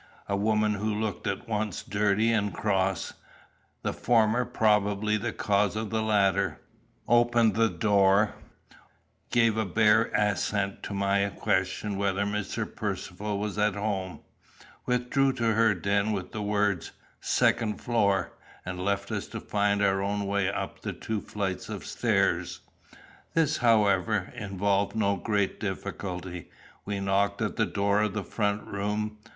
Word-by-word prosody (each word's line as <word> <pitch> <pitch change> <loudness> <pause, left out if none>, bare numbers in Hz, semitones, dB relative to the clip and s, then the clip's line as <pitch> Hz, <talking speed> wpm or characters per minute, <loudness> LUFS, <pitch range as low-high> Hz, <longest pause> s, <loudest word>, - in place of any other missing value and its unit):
A 100 - 0
woman 105 +1 +2
who 105 +1 -2
looked 110 -2 -3
at 95 -1 -3
once 105 -3 -2
dirty 105 +2 +1
and 105 -3 +1
cross, 95 -2 0 0.7
the - - -1
former 115 +1 +2
probably 105 -2 +2
the 115 +2 -2
cause 105 -1 +1
of 110 0 -3
the 110 0 0
latter, 100 -3 +1 0.5
opened 120 -2 +4
the 115 +2 +3
door, 100 +2 +3 1.0
gave 115 -2 +3
a 110 - +2
bare 110 +3 +4
assent 100 -1 0
to 100 - -5
my 100 0 +1
question 95 +1 -1
whether 100 0 0
Mr. 105 -1 -2
Percivale 105 0 -4
was 105 0 -3
at 105 -1 +2
home, 100 -3 -3 0.7
withdrew 125 +2 +2
to 115 -3 +1
her 110 -1 +3
den 100 +3 0
with 95 -2 -4
the 110 - -4
words 100 -4 0 0.3
"second 105 -2 +1
floor," 100 -5 +1 0.3
and 90 0 -4
left 100 0 -1
us - - -3
to - - -6
find 100 0 0
our 95 -1 +2
own 100 +1 -1
way 100 -1 +1
up 100 - -4
the - - -4
two 110 -2 -4
flights 95 -3 -4
of - - -6
stairs. - - 0 0.7
This, 165 -3 +2
however, 105 -4 +2
involved 100 -2 0
no 100 -2 +2
great 100 +1 -1
difficulty. 95 -3 -5 0.4
We 100 -1 -3
knocked 100 +1 +1
at 105 - -2
the 115 - +1
door 100 +1 +1
of 105 -3 -1
the 105 - -2
front 105 0 -1
room. 105 +2 -3
105 Hz, 145 wpm, -28 LUFS, 100-110 Hz, 1.0 s, opened